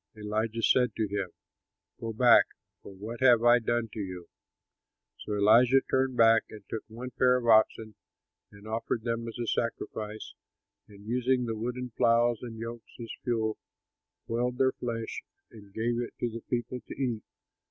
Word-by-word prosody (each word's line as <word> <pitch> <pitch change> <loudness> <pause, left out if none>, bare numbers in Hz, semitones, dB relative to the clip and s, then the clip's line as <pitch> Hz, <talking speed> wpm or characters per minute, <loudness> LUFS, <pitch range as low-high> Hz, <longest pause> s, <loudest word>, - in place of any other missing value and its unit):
Elijah 110 +2 -2
said 125 +1 +3
to 110 -2 0
him, 100 -2 -3 0.7
"Go 115 - -4
back, 120 +2 +6 0.4
for - - -11
what 110 +5 -8
have 120 -3 +5
I 120 +1 +6
done 120 0 -1
to - - -6
you?" 90 -3 -6 0.9
So 105 - -5
Elisha 120 +6 +5
turned 130 -1 +1
back 115 0 +6
and 105 -2 -11
took 110 - -4
one 120 +3 -8
pair 125 +1 +3
of 125 - -4
oxen 110 -1 +3 0.6
and 100 +1 -14
offered 110 0 -2
them 115 0 -2
as 115 - -7
a 120 - -2
sacrifice 110 -2 -3 0.5
and, 100 0 -15
using 125 +2 +1
the 115 -1 -3
wooden 125 +3 -4
ploughs 115 +1 +3
and 115 -2 -7
yokes 115 +1 -8
as 115 -2 -7
fuel, 110 -3 -1 0.7
boiled 125 +2 -1
their 130 0 +3
flesh, 115 -3 -5 0.3
and 100 -3 -14
gave 115 +3 -1
it 120 - -6
to 120 - -1
the 115 +1 -7
people 120 +1 -2
to - - -7
eat. 120 -5 -1
115 Hz, 165 wpm, -29 LUFS, 110-120 Hz, 0.9 s, back